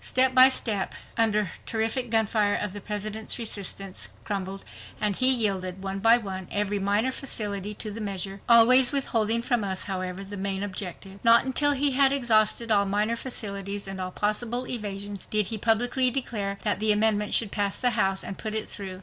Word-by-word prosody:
Step 260 0 +3
by 255 +1 +8
step 215 -7 0 0.2
under 210 -3 +1 0.2
terrific 225 +3 -2
gunfire 215 -2 +1
the 205 +2 -8
President's 210 +2 -3
resistance 200 -4 -3
crumbled, 195 -1 -5 0.4
and 205 -2 0
he 255 - +5
yielded, 195 -6 +2
one 195 0 -4
by 225 +3 +5
one, 190 -5 -7
every 205 0 -1
minor 205 +6 0
facility 210 -6 -3
to 215 +1 -7
the 225 +2 -7
measure, 195 -1 -5
always 240 +2 +7
withholding 230 -5 +1
from 240 -3 -1
us, 190 -1 -3
however, 185 -1 -5
the 200 +1 -9
main 195 0 -3
objective. 195 0 -7
Not 230 +1 +5
until 290 +2 +3
he 280 +1 +2
had 270 +1 +4
exhausted 230 -3 +2
all 200 -1 +2
minor 210 +3 0
facilities, 200 -5 -4
and 195 -1 -5
all 185 - -4
possible 225 +6 -2
evasions, 205 -4 -5
did 210 -1 +1
he 220 - -3
publicly 245 +4 +1
declare 215 -6 -4
that 205 -2 0
the 215 0 +3
amendment 210 0 +2
should 220 -4 +2
pass 200 -2 0
the 245 - +1
House, 195 -4 0
and 195 - -7
put 215 -1 -4
it 220 - 0
through. 190 -2 -7
210 Hz, 180 wpm, -25 LUFS, 195-235 Hz, 0.4 s, by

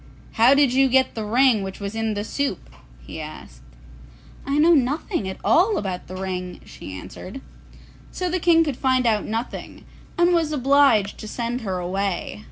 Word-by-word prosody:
'How 240 +5 +5
did 280 -3 +3
you 270 0 +4
get 260 0 +3
the 220 - -4
ring 235 +1 +3
which 190 -1 -6
was 200 0 -5
in 225 -1 -2
the 205 - -2
soup?' 225 - -3 0.3
he - - -7
asked. - - -10 0.9
'I 280 +1 0
know 325 +3 +5
nothing 275 - 0
at 190 - -6
all 395 +6 +3
about 185 -3 -4
the 185 - -8
ring,' 185 -1 -5
she - - -10
answered. 95 - -9 0.7
So 365 - -3
the 360 +1 -1
King 330 -1 +4
could 290 -6 -3
find 260 -2 +1
out 215 -3 +1
nothing, 225 +3 -5 0.3
and 345 +1 +4
was 325 -3 +1
obliged 275 -7 +3
to 215 - -8
send 235 +3 -3
her 190 -4 -3
away. 185 +1 -3
235 Hz, 175 wpm, -22 LUFS, 195-280 Hz, 0.9 s, How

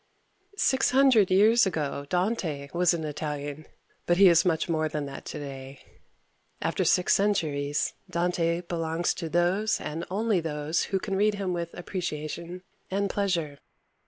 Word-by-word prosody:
Six 265 -8 +2
hundred 255 -6 +5
years 215 +4 +5
ago 145 -5 -3
Dante 180 -7 -1
was 175 0 +3
an 160 - -4
Italian, 150 0 -5 0.4
but 175 - +3
he 195 -1 +8
is 170 -1 +5
much 165 -2 0
more 155 -2 0
than 150 -1 -3
that 140 - -8
today. 135 -1 -7 0.8
After - - -1
six 180 - +3
centuries 150 -8 0 0.2
Dante 170 -1 0
belongs 170 -1 -1
to 170 - -5
all - - -10
those 180 +6 +1
and 160 +3 -5
only 210 +1 +1
those 155 0 -1
who 195 - -1
can 195 0 -3
read 210 +2 +2
him 195 -3 -2
with 170 -1 -3
appreciation 170 0 -5 0.3
and 200 +1 -1
pleasure. 170 -8 -1
170 Hz, 150 wpm, -27 LUFS, 155-195 Hz, 0.8 s, he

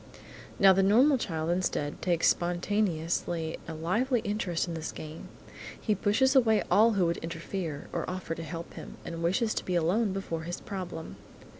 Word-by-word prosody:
Now 195 -1 +7
the 195 - +3
normal 250 +8 +5
child, 160 -5 -2
instead, 175 -5 -1
takes 170 -2 +2
spontaneously 175 -3 0
a 165 - -5
lively 225 - +1
interest 190 -5 -1
in 170 - -4
this 160 -1 -4
game. 155 +1 -9 0.5
He 215 - +1
pushes 215 +7 +2
away 220 -6 +4
all 220 +5 +6
who 190 -4 +2
would 170 0 0
interfere, 165 -2 -5
or - - -2
offer 180 -2 -4
to 165 - -6
help 165 +1 -7
him, - - -9
and 165 -1 -5
wishes 190 +6 +1
to - - -2
be 180 - -2
alone 190 +6 +2
before 185 -4 -3
his 175 +2 -5
problem. 185 -4 -6
180 Hz, 170 wpm, -29 LUFS, 165-205 Hz, 0.5 s, Now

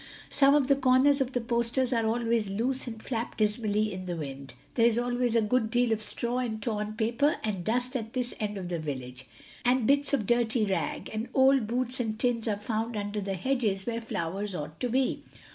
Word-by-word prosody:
Some 280 0 +5
of 290 -2 +4
the 275 +1 +4
corners 270 +1 +4
of 265 0 -1
the 245 - 0
posters 235 +2 0
are 230 -2 +1
always 230 -2 +1
loose 250 +7 -1
and 225 -2 -6
flap 235 -2 -3
dismally 215 -1 +1
in 185 0 -6
the 175 -1 -3
wind. 140 -3 -7 0.2
There 230 0 +4
is 235 -1 +2
always 245 -1 0
a 230 - +4
good 220 +1 +1
deal 240 0 +2
of 220 -1 +1
straw 240 +3 -2
and 230 -4 -2
torn 210 -1 -2
paper 235 +7 +1
and 200 -5 -2
dust 245 +6 0
at 225 -2 -3
this 250 -1 -2
end 210 -2 -2
of 180 -2 -5
the 170 -2 -2
village, 130 -4 -6 0.4
and 250 -1 +3
bits 280 +3 +3
of 275 -8 +1
dirty 240 0 +2
rag, 185 -6 -2
and 220 +3 -3
old 265 -3 +5
boots 250 +2 -1
and 220 -3 -2
tins 240 -2 0
are 210 -2 0
found 220 +2 -2
under 205 0 -3
the 195 -1 -2
hedges 210 -2 0
where 235 -1 -2
flowers 195 -1 -3
ought 150 0 -6
to 250 - -1
be. 260 +2 +1
230 Hz, 210 wpm, -28 LUFS, 210-250 Hz, 0.4 s, Some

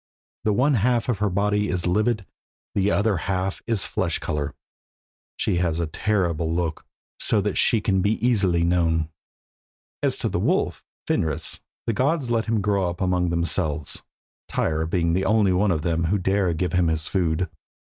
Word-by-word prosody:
The 105 - +3
one 135 +7 +3
half 120 +1 +1
of 115 -6 0
her 105 -1 +1
body 105 +2 +1
is 90 -2 -1
livid, 105 +3 +1 0.5
the 100 0 +2
other 105 -1 +2
half 95 +3 -2
is 115 -4 +1
flesh - - -1
colour. 75 -1 -3 0.8
She - - 0
has 85 -2 0
a 85 - +1
terrible 85 -2 0
look, 85 -1 -2 0.3
so - - +2
that - - -1
she 110 - +3
can 95 -2 +1
be 105 +3 +2
easily 100 -9 +2
known. 85 -2 +1 0.9
As - - 0
to - - -2
the - - -1
wolf, - - 0 0.2
Fenris, 80 -2 -1 0.3
the 115 - 0
gods 135 +2 0
let 115 -1 +1
him 110 -2 0
grow 100 -3 +1
up 85 - -6
among 90 -2 +1
themselves, 85 -3 -1 0.5
Tyr 80 0 0
being 85 -1 +1
the 95 +2 +1
only 105 -4 +3
one 100 +3 +2
of 80 -4 0
them 85 -1 0
who 95 +6 +2
dare 95 -1 +1
give 90 0 -1
him 90 -2 +3
his 80 -1 0
food. 90 -2 0
95 Hz, 175 wpm, -24 LUFS, 85-105 Hz, 0.9 s, The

